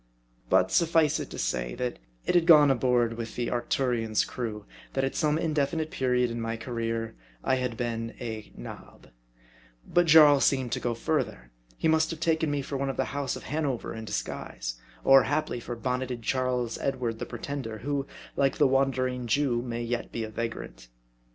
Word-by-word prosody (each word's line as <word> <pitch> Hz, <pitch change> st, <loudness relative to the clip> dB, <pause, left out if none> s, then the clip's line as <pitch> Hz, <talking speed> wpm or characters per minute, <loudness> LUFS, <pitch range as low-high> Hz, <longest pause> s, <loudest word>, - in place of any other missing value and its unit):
But 95 Hz, 0 st, +4 dB
sufncd 160 Hz, -, +3 dB
it -, -, -5 dB
to -, -, -8 dB
say, -, -, -2 dB
that 125 Hz, -, -3 dB, 0.3 s
it -, -, +1 dB
had 175 Hz, -2 st, +3 dB
gone 150 Hz, -4 st, +8 dB
abroad 120 Hz, -2 st, +2 dB
among 115 Hz, 0 st, -4 dB
the 120 Hz, -1 st, -2 dB
Arcturion's 120 Hz, -3 st, 0 dB
crew, 110 Hz, -4 st, -5 dB, 0.3 s
that 135 Hz, -, 0 dB
at 135 Hz, -, 0 dB
some 150 Hz, -1 st, +2 dB
indefinite 155 Hz, 0 st, 0 dB
period 125 Hz, -2 st, +1 dB
of 115 Hz, -, -4 dB
my 115 Hz, 0 st, -2 dB
ca 115 Hz, +3 st, -8 dB
reer, 115 Hz, -1 st, -2 dB, 0.3 s
I 130 Hz, -, +2 dB
had 125 Hz, -3 st, -2 dB
been 115 Hz, -1 st, -3 dB
a 110 Hz, -3 st, -6 dB
" -, -, -25 dB
nob." -, -, -12 dB, 0.8 s
But 175 Hz, -1 st, +3 dB
Jarl 150 Hz, -3 st, +8 dB
seemed 130 Hz, -3 st, +2 dB
to -, -, 0 dB
go 120 Hz, -1 st, -1 dB
further. -, -, -2 dB, 0.3 s
He -, -, +1 dB
must 160 Hz, 0 st, +3 dB
have 165 Hz, -, -5 dB
taken 160 Hz, -2 st, +1 dB
me 145 Hz, -1 st, -1 dB
for 140 Hz, -, -4 dB
one 135 Hz, 0 st, -1 dB
of 135 Hz, -, -4 dB
the -, -, +1 dB
House 140 Hz, -2 st, -1 dB
of -, -, -8 dB
Hanover 145 Hz, -5 st, -2 dB
in 110 Hz, -, -6 dB
disguise; -, -, -4 dB, 0.2 s
or, 135 Hz, 0 st, +8 dB
haply, 150 Hz, -3 st, -1 dB
for 120 Hz, +1 st, -5 dB
bonneted 125 Hz, 0 st, -3 dB
Charles 125 Hz, -2 st, 0 dB
Edward 125 Hz, -4 st, -2 dB
the -, -, -4 dB
Pretender, 120 Hz, -2 st, -5 dB
who, 140 Hz, +3 st, -2 dB, 0.3 s
like 135 Hz, -1 st, +2 dB
the 150 Hz, -, +5 dB
Wandering 130 Hz, -2 st, +1 dB
Jew, 125 Hz, -1 st, +2 dB
may 120 Hz, -1 st, -4 dB
yet 120 Hz, 0 st, -3 dB
be 115 Hz, -, -3 dB
a 110 Hz, -, -6 dB
va 115 Hz, +1 st, -1 dB
grant. 110 Hz, -, -10 dB
125 Hz, 190 wpm, -28 LUFS, 115-140 Hz, 0.8 s, gone